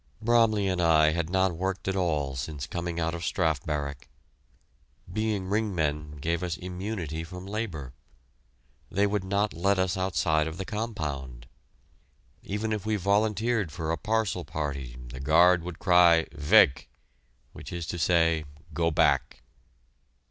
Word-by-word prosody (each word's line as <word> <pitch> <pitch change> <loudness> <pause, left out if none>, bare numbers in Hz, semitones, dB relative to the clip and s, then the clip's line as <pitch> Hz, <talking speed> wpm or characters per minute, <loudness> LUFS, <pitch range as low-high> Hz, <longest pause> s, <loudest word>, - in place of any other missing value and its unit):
Bromley 110 -3 +3
and 90 -2 0
I 80 -2 +5
had 85 0 -2
not 95 0 +2
worked 95 +2 -3
at 95 - 0
all 75 -7 0
since 70 +2 -4
coming 85 -1 -4
out 80 0 -1
of 85 0 -5
Strafe 80 -8 0
Barrack. 70 -3 -4 1.1
Being 110 -3 -1
ring 105 +1 -1
men 75 -2 -1
gave 85 +4 -1
us 85 -2 -3
immunity 90 -3 -5
from 90 +2 -9
labor. 95 - -5 1.0
They 100 +2 +2
would 105 -1 -1
not 100 +2 0
let 100 +4 +1
us 95 -1 0
outside 80 -4 +1
of 80 +1 -6
the 95 - -4
compound. 75 - -4 1.0
Even 105 +2 -3
if 105 -3 -3
we 110 0 0
volunteered 105 0 +1
for 80 +1 -3
a - - +1
parcel 105 -1 0
party, 70 -6 -5
the 65 +1 -8
guard 85 +5 +5
would 90 -1 -6
cry 90 -3 +5
"Weg!" 70 -2 +4 0.7
which - - -10
is 85 -2 -4
to 85 +1 -4
say, 80 -2 +2 0.3
"Go 85 -1 +1
back." 80 - +1
85 Hz, 150 wpm, -27 LUFS, 80-100 Hz, 1.1 s, I